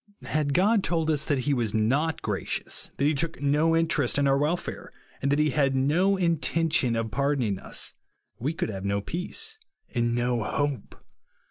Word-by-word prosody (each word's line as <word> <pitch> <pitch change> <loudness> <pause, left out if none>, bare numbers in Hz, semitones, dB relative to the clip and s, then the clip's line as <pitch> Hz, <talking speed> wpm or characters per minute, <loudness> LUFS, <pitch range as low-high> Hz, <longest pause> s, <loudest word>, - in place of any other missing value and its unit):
Had 145 -2 0
God 200 +3 +4
told 165 -2 +1
us 150 -1 0
that 140 -3 +1
he 145 +3 +1
was 115 -5 -1
not 140 +9 +1
gracious, - - -3
that - - -1
he 150 - +3
took 160 +3 -2
no 150 +3 +2
interest 160 -6 +1
in 140 -1 +3
our 135 0 +3
welfare, 155 +5 -2 0.3
and 140 - +1
that 145 - +3
he 150 -1 +2
had 135 0 +2
no 170 +9 +3
intention 165 -6 +1
of 115 -1 -2
pardoning 130 -5 0
us, - - -7 0.5
we 135 +6 -1
could 160 - -3
have 95 -3 -5
no 100 0 0
peace 440 - -4 0.3
and 120 -1 +1
no 120 -1 0
hope. 140 0 -2
145 Hz, 175 wpm, -27 LUFS, 125-165 Hz, 0.5 s, God